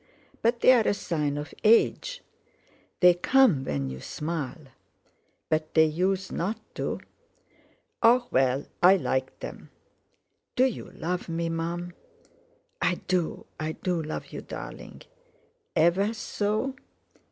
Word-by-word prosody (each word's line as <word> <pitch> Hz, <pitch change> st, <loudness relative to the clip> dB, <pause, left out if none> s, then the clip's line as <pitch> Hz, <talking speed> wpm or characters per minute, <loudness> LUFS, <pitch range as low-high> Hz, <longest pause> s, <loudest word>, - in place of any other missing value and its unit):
But 235 Hz, +1 st, +1 dB
they're 250 Hz, -4 st, +6 dB
a -, -, +2 dB
sign 150 Hz, -7 st, -1 dB
of 145 Hz, -1 st, -6 dB
age." 230 Hz, -, +3 dB, 0.8 s
"They 180 Hz, -1 st, +8 dB
come 175 Hz, -, +4 dB
when 70 Hz, -, -2 dB
you 65 Hz, -, -7 dB
smile." 150 Hz, -3 st, -5 dB, 0.8 s
"But 155 Hz, 0 st, -1 dB
they 160 Hz, -1 st, +7 dB
usen't 185 Hz, +4 st, -1 dB, 0.2 s
to." -, -, -3 dB, 1.0 s
"Oh! 240 Hz, +2 st, +5 dB
well, 130 Hz, +1 st, +2 dB, 0.2 s
I 185 Hz, +2 st, +8 dB
like 130 Hz, -6 st, -2 dB
them. -, -, -8 dB, 0.9 s
Do 255 Hz, -, +5 dB
you 260 Hz, -, -2 dB
love 175 Hz, +2 st, -3 dB
me, 165 Hz, 0 st, -1 dB
Mum?" 170 Hz, +2 st, -3 dB, 0.9 s
"I 180 Hz, -, +2 dB
do—I 160 Hz, -3 st, -2 dB
do 180 Hz, -1 st, -2 dB
love 155 Hz, 0 st, -6 dB
you, -, -, -5 dB
darling." -, -, -9 dB, 0.7 s
"Ever 195 Hz, +7 st, +3 dB
so?" 215 Hz, +4 st, -1 dB
175 Hz, 115 wpm, -27 LUFS, 155-210 Hz, 1.0 s, They